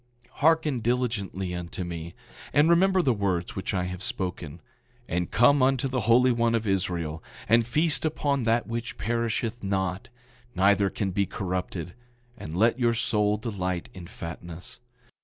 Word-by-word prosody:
Hearken 155 Hz, -4 st, +3 dB
diligently 110 Hz, -6 st, -1 dB
unto 90 Hz, +1 st, -5 dB
me, 85 Hz, -1 st, -6 dB, 0.4 s
and 150 Hz, +3 st, +5 dB
remember 185 Hz, +1 st, +4 dB
the 130 Hz, -, +3 dB
words 95 Hz, -4 st, -1 dB
which 95 Hz, -, -3 dB
I 95 Hz, -3 st, 0 dB
have 90 Hz, 0 st, -5 dB
spoken; 90 Hz, -5 st, -4 dB, 0.5 s
and 90 Hz, +1 st, -1 dB
come 135 Hz, +4 st, +4 dB
unto 135 Hz, 0 st, +2 dB
the 130 Hz, -1 st, -1 dB
Holy 125 Hz, +2 st, +6 dB
One 115 Hz, -1 st, +2 dB
of 115 Hz, -1 st, -1 dB
Israel, 85 Hz, -5 st, -1 dB, 0.3 s
and 115 Hz, +1 st, +4 dB
feast 155 Hz, +5 st, +2 dB
upon 145 Hz, -4 st, 0 dB
that 115 Hz, +1 st, +2 dB
which 115 Hz, +1 st, -5 dB
perisheth 115 Hz, +1 st, -1 dB
not, 95 Hz, +3 st, -2 dB, 0.5 s
neither 100 Hz, +1 st, +4 dB
can 95 Hz, -1 st, -2 dB
be 100 Hz, +1 st, 0 dB
corrupted, 90 Hz, -2 st, -4 dB, 0.4 s
and 80 Hz, -7 st, -7 dB
let 115 Hz, +5 st, +3 dB
your 120 Hz, -1 st, +2 dB
soul 105 Hz, -2 st, +1 dB
delight 95 Hz, -6 st, -3 dB
in 90 Hz, -2 st, -9 dB
fatness. 85 Hz, +5 st, -8 dB
105 Hz, 150 wpm, -27 LUFS, 90-120 Hz, 0.5 s, Holy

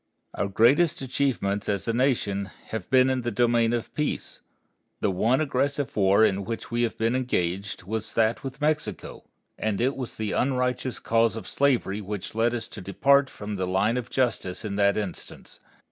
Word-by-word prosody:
Our 100 Hz, -, -1 dB
greatest 135 Hz, -, +3 dB
achievements 125 Hz, -7 st, -1 dB
as 100 Hz, +1 st, -1 dB
a 115 Hz, -, +1 dB
nation 115 Hz, -6 st, +1 dB, 0.2 s
have 110 Hz, -5 st, -5 dB
been 130 Hz, 0 st, +5 dB
in 130 Hz, -1 st, 0 dB
the 120 Hz, -, -2 dB
domain 120 Hz, 0 st, +2 dB
of 120 Hz, -1 st, -3 dB
peace. 150 Hz, -1 st, -3 dB, 0.6 s
The 100 Hz, -, +1 dB
one 115 Hz, +8 st, +2 dB
aggressive 140 Hz, -1 st, -1 dB
war 100 Hz, +1 st, +5 dB
in 100 Hz, -1 st, 0 dB
which 115 Hz, +4 st, -5 dB
we 120 Hz, 0 st, 0 dB
have 120 Hz, -2 st, -1 dB
been 115 Hz, +2 st, +1 dB
engaged 95 Hz, -7 st, -2 dB
was 110 Hz, +3 st, -4 dB
that 115 Hz, 0 st, +2 dB
with 135 Hz, +1 st, -7 dB
Mexico, 150 Hz, -9 st, -2 dB, 0.3 s
and 105 Hz, -2 st, -1 dB
it 130 Hz, +4 st, +1 dB
was 130 Hz, -3 st, -6 dB
the 110 Hz, -2 st, -2 dB
unrighteous 125 Hz, -1 st, 0 dB
cause 115 Hz, 0 st, +2 dB
of 110 Hz, -4 st, -7 dB
slavery 120 Hz, -7 st, +1 dB
which 105 Hz, -1 st, -6 dB
led 115 Hz, +2 st, +1 dB
us 120 Hz, -, -4 dB
to -, -, -9 dB
depart 135 Hz, +9 st, +3 dB
from 105 Hz, 0 st, -6 dB
the 95 Hz, -1 st, -1 dB
line 100 Hz, +5 st, +1 dB
of 125 Hz, -2 st, -3 dB
justice 120 Hz, -7 st, -1 dB
in 100 Hz, -2 st, -3 dB
that 100 Hz, -1 st, +3 dB
instance. 105 Hz, -4 st, -6 dB
115 Hz, 180 wpm, -26 LUFS, 100-130 Hz, 0.6 s, been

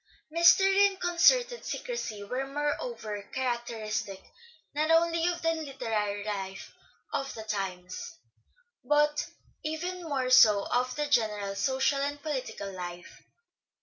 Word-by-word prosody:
Mystery 385 Hz, +4 st, +6 dB
and 390 Hz, -1 st, -6 dB
concerted 485 Hz, +8 st, +3 dB
secrecy 230 Hz, -, -4 dB
were 255 Hz, +6 st, -3 dB
moreover 290 Hz, -, -3 dB
characteristic 235 Hz, -6 st, -3 dB, 0.5 s
not 305 Hz, +2 st, 0 dB
only 335 Hz, +1 st, +3 dB
of 350 Hz, -1 st, -2 dB
the 330 Hz, -, +3 dB
literary 225 Hz, -10 st, -3 dB
life 195 Hz, -2 st, -5 dB, 0.4 s
of 270 Hz, 0 st, -2 dB
the 220 Hz, -, -7 dB
times, 195 Hz, -, -5 dB, 0.7 s
but 295 Hz, 0 st, +2 dB, 0.4 s
even 355 Hz, +4 st, -3 dB
more 275 Hz, -6 st, -2 dB
so 210 Hz, -5 st, +7 dB
of 250 Hz, +1 st, +1 dB
the 295 Hz, -, -1 dB
general 215 Hz, -7 st, +1 dB
social 265 Hz, +5 st, +1 dB
and 285 Hz, +1 st, -2 dB
political 255 Hz, -9 st, -4 dB
life. 175 Hz, -1 st, -8 dB
270 Hz, 115 wpm, -29 LUFS, 210-330 Hz, 0.7 s, so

